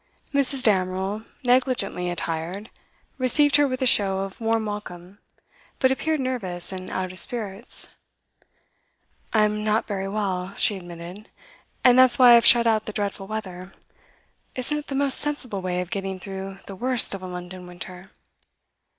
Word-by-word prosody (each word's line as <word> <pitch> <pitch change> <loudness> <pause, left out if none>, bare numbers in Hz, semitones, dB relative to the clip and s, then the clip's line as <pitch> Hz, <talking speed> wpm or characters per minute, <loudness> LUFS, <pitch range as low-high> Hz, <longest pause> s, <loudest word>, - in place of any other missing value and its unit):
Mrs. 275 -2 +2
Damerel, 190 +1 0 0.2
negligently 245 -8 +1
attired, 175 +4 -4 0.5
received 290 +3 +5
her 290 -1 +3
with 255 0 -3
a - - +2
show 195 -5 +3
of 195 +3 -7
warm 225 0 0
welcome, 200 -2 -8 0.6
but 260 -1 +2
appeared 315 +3 -1
nervous 200 -11 -3
and 185 -1 -7
out 185 -1 -4
of 185 - -3
spirits. 215 +1 -3 1.4
'I 215 -2 +3
am 210 0 -2
not 215 +1 0
very 195 -2 -4
well,' 195 -2 -3
she 215 -5 +4
admitted, 175 +2 -10 0.5
'and 250 0 +6
that's 255 -2 +6
why 250 -2 +7
I - - +9
have 235 -2 +6
shut 235 -1 +8
out 220 -2 +1
the 215 - -6
dreadful 200 -2 -4
weather. 190 -3 -7 0.8
Isn't 280 +4 -1
it 295 - -11
the 275 - -5
most 275 -1 +6
sensible 260 -9 -1
way 180 -1 -2
of 180 - -8
getting 195 -1 -4
through 195 0 -8
the 195 - -9
worst 250 +2 +2
of 195 - -6
a 185 - -7
London 180 0 -8
winter? 180 +1 -10
205 Hz, 160 wpm, -23 LUFS, 185-245 Hz, 1.4 s, I